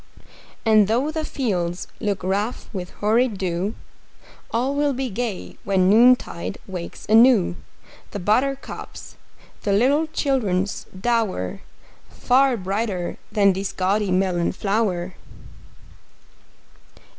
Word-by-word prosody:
And 215 -2 +5
though 250 +8 +1
the 315 0 -3
fields 180 - -2
look 200 -4 -2
rough 200 +5 -2
with 180 -2 -5
hoary 225 +5 +2
dew, 190 -2 -3 0.7
All 250 +4 0
will 290 0 +1
be 260 -1 -3
gay 215 -2 -4
when 190 -1 +3
noontide 230 -6 +3
wakes 180 -3 -7
anew 220 -5 +5 0.5
The - - -5
buttercups, 255 +8 -2 0.5
the 200 - 0
little 280 +9 +3
children's 215 -11 -1
dower 190 - -2 0.5
Far 260 0 +2
brighter 195 -2 -2
than 200 -2 +4
this 195 +1 -3
gaudy 195 +2 0
melon 185 -2 +1
flower! 195 -4 -1
210 Hz, 105 wpm, -22 LUFS, 185-245 Hz, 0.7 s, And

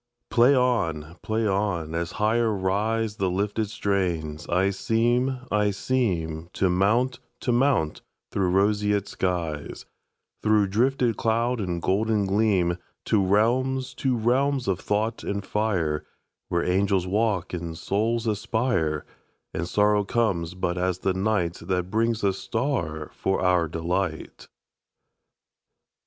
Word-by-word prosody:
Play 125 +4 +5
on! 85 - 0
Play 110 +1 -1
on! 95 -6 -1
As 85 +1 -2
higher 115 +2 +2
riseThe 105 0 0
lifted 105 +3 -1
strains, 90 -7 -2
I 95 +3 +2
seem, 120 +6 +1
I 105 0 +2
seemTo 90 -6 -1
mount, 115 +8 +2 0.2
to 125 - 0
mount 120 - +2 0.3
through 95 -2 +1
roseate 105 +1 +2
skies, 85 -7 -3 0.6
Through 105 -2 +3
drifted 120 +2 +1
cloud 115 +1 +1
and 90 -3 -2
golden 105 +1 +1
gleam, 95 -4 +2 0.3
To 105 -3 +2
realms, 125 +7 +1
to 130 -3 0
realms 130 +3 +1
of 95 -2 0
thought 110 +3 -1
and 100 -1 -3
fire, 90 -9 0 0.5
Where 85 -1 +1
angels 95 0 +1
walk 100 -2 0
and 85 -2 -4
souls 115 +6 0
aspire, 105 - 0 0.5
And 85 +2 -3
sorrow 105 0 +3
comes 100 -6 0
but 90 -1 -2
as 90 0 0
the 95 0 0
nightThat 90 -2 -1
brings 115 0 +1
a 100 -1 +3
star 95 - -2
for 95 - -1
our 90 -2 +3
delight. 85 +1 -3
100 Hz, 120 wpm, -25 LUFS, 90-115 Hz, 0.6 s, Play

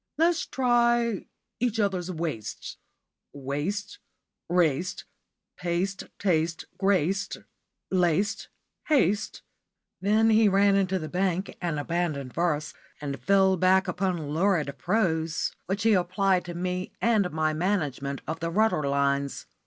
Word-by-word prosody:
Let's 335 +1 +2
try 240 -3 +2 0.3
'each 230 -2 0
other's 190 -4 0
waists.' 160 - -5 0.6
Waste, 145 - -4 0.5
raced, 175 -1 +1 0.5
paste, 180 +2 -2
taste, 165 -3 0
graced, 195 -1 +1 0.5
laced, 185 +3 +1 0.4
haste 210 - +1 0.3
" - - -59
Then 215 +3 +3
he 220 -1 +5
ran 200 +1 +4
into 190 -1 +1
the 155 -3 -5
bank 185 +2 -1
and 170 -4 -1
abandoned 150 -4 -2
verse, 155 -3 -1 0.3
and 140 -2 -5
fell 190 -1 +4
back 190 +2 +3
upon 180 -4 -2
lurid 160 -5 +1
prose, 165 - 0 0.2
which 195 +3 -2
he 225 -1 +5
applied 185 0 +2
to 175 -1 -6
me 180 +1 -3
and 215 -5 +2
my 155 0 0
management 150 -6 -1
of 160 +1 -3
the 165 - -2
rudder 215 -1 +2
lines. 140 0 0
180 Hz, 120 wpm, -27 LUFS, 160-200 Hz, 0.6 s, he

